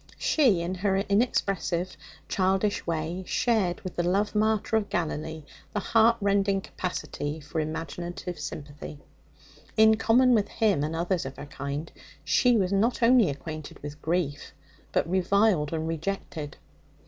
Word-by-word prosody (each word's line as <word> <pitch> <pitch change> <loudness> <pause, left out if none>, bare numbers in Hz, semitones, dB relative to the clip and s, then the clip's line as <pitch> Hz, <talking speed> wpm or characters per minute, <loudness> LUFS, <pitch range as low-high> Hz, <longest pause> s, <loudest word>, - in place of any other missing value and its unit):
She, 245 - +3
in 170 +2 -2
her 190 +1 0
inexpressive, 195 -4 0 0.3
childish 195 +2 0
way, 165 +2 -2
shared 210 -8 +1
with 185 - -7
the - - +2
love 195 +4 +1
martyr 220 0 +1
of 210 -2 -2
Galilee 160 -2 -3 0.3
the 210 - 0
heartrending 200 -3 +3
capacity 160 -5 -4
for 150 +2 -4
imaginative 170 +3 -4
sympathy. 145 0 -7 0.8
In 220 0 +6
common 245 +3 +4
with 210 -3 +3
Him 205 -10 +1
and 155 +2 -2
others 175 +1 0
of 135 0 -7
her - - -7
kind, 140 +2 -5 0.3
she 245 -2 +4
was 190 -2 +1
not 230 +5 +1
only 235 -5 +6
acquainted 155 +2 -6
with 145 0 -7
grief, 160 -4 -2 0.4
but - - +1
reviled 185 -3 +2
and 160 -1 -2
rejected. 165 -3 -4
180 Hz, 135 wpm, -27 LUFS, 160-210 Hz, 0.8 s, In